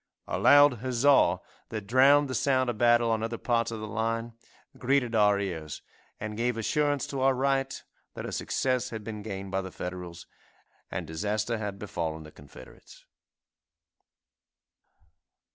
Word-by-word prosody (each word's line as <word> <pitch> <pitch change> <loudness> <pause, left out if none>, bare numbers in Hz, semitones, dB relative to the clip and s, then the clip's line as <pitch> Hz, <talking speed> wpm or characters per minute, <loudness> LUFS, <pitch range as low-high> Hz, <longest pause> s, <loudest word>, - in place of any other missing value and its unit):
A - - -2
loud 145 -4 +6
huzza, 130 -6 +3 0.3
that 110 -3 -5
drowned 135 +6 +5
the 130 - -4
sound 130 0 +1
of 110 - -10
battle 120 -1 +4
on 110 -1 0
other 115 +1 -3
parts 115 -2 0
of 115 -1 -5
the 110 - -6
line, 115 +2 -2 0.4
greeted 130 -2 0
our 105 -2 +4
ears 80 -6 -5 0.4
and 105 0 -5
gave 120 +1 -1
assurance 145 +5 0
to 135 -2 -4
our 135 0 +3
right 135 0 0 0.4
that - - -6
a - - -5
success 130 -2 -1
had 110 -2 -7
been 105 -1 -6
gained 100 -2 -6
by 95 0 0
the 95 - -7
Federals, 90 -1 -7 0.6
and 90 -3 -4
disaster 105 +8 -2
had 105 -2 -4
befallen 80 -6 -4
the 75 - -12
Confederates. 70 -4 -15
115 Hz, 150 wpm, -28 LUFS, 100-130 Hz, 0.6 s, loud